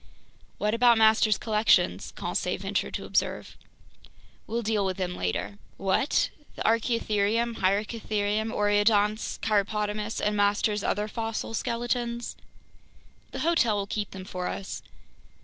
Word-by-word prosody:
"What 210 +1 0
about 235 0 +5
master's 220 -1 +5
collections?" 215 0 +2
Conseil - - -2
ventured - - -2
to - - -5
observe. - - -1 0.9
"We'll 235 +1 -2
deal 215 -1 +1
with 190 -1 -1
them 180 -1 -2
later." 90 - -3 0.2
"What! 195 +9 +1 0.2
The - - -4
archaeotherium, 230 0 +1
hyracotherium, 210 +2 0
oreodonts, 205 0 +2
cheiropotamus, 210 0 0
and 210 0 0
master's 205 0 +2
other 210 +1 0
fossil 225 0 -4
skeletons?" 235 0 -2 0.9
"The - - -6
hotel 310 -10 +3
will 200 -1 -1
keep 205 0 -3
them 190 -1 -9
for 180 -1 -4
us." 195 - -5
215 Hz, 120 wpm, -27 LUFS, 205-230 Hz, 0.9 s, about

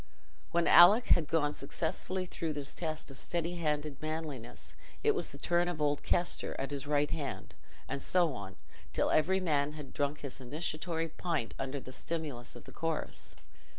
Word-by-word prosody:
When 170 0 +2
Alick 205 +8 +8
had 165 -4 +2
gone 145 -2 +2
successfully 180 +6 -2
through 165 -3 -3
this 140 -1 -5
test 155 -4 -3
of 135 - -7
steady 175 0 -1
handed 150 -3 -1
manliness, 155 -6 -5 0.3
it 435 0 +5
was 410 - +1
the - - -9
turn 175 0 +2
of 175 -3 -3
old 145 -1 +1
Kester, 175 0 0
at 135 +1 -2
his 140 -1 -4
right 145 0 +2
hand—and 140 -2 -6
so 175 -2 +3
on, 95 -4 -7 0.4
till - - +2
every 185 +5 +4
man 150 -5 +1
had 150 -3 -9
drunk 145 +1 -1
his 140 -1 -6
initiatory 160 +4 -2
pint 165 -6 -2
under 135 +1 -2
the 130 - -10
stimulus 145 -4 -4
of - - -10
the - - -11
chorus. 165 -1 -3
155 Hz, 170 wpm, -33 LUFS, 140-170 Hz, 0.4 s, Alick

